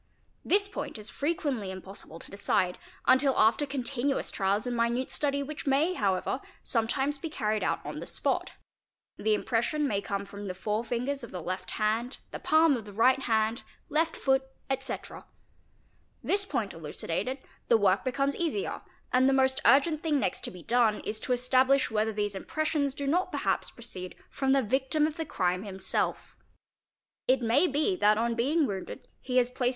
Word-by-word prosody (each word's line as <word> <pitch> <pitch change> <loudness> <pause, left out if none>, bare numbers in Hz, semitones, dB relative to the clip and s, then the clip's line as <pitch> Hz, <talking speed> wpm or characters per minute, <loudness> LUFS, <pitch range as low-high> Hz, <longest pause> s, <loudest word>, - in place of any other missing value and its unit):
This 400 +1 +3
point 395 - -5
it - - -8
is 210 - -7
frequently 280 - -1
impossible 190 -3 -8
to - - -12
decide 185 -2 0 0.3
until 265 +1 +4
after 225 +7 +4
continuous 270 0 -1
trials 200 +1 0
and 245 -1 -2
minute 235 +2 0
study 280 -1 0
which 290 0 -7
may, 290 +7 +3
however, 200 - 0 0.2
sometimes 265 +5 0
be 325 - -4
carried 215 -7 -1
out - - -1
on - - -5
the - - -6
spot: - - -1 0.6
the 215 0 +2
impression 245 +8 0
may 200 -5 0
come 200 0 -3
from 200 0 -8
the 185 - -4
fore 210 +4 -1
fingers 250 +4 -2
of 235 - -7
the 180 - -6
left 185 +2 -4
hand, 225 +4 0
the - - -5
palm 315 -1 +4
of 225 -4 -5
the 205 - -9
right 255 +6 +4
hand, 225 -2 +1 0.3
left 320 +2 +1
foot, 265 -1 +2 0.3
etc. 270 - -4 1.0
This 400 0 +3
point 235 - -2
elucidated, 165 - -3 0.3
the 230 - +5
work 200 -2 +3
becomes 275 +2 0
easier, 345 +4 -2 0.3
and 255 +1 +5
the - - +3
most 265 0 +3
urgent 290 +5 +5
thing 305 -3 +1
next 180 - -1
to - - -1
be 180 -2 -11
done 230 -3 +2
is 215 +1 -3
to 255 - -3
establish 255 +2 +3
whether 220 0 +1
these 205 -1 -1
inypressions 285 +6 -1
do 285 - -4
not 345 +7 +1
perhaps - - 0
proceed 185 -6 -6 0.2
from 270 -1 0
the 270 -1 +4
victim 265 +6 +1
of 310 +1 -3
the 325 - -2
crime 180 -7 0
himself. 195 -2 -3 0.9
It 255 -1 +3
may 260 +10 +4
be 305 +7 +1
that 210 -7 +4
on 235 +1 +1
being 285 +7 +2
wounded 195 -6 -5
he 255 -1 -1
has 250 0 +3
placed. 250 -1 +1
250 Hz, 180 wpm, -29 LUFS, 210-280 Hz, 1.0 s, the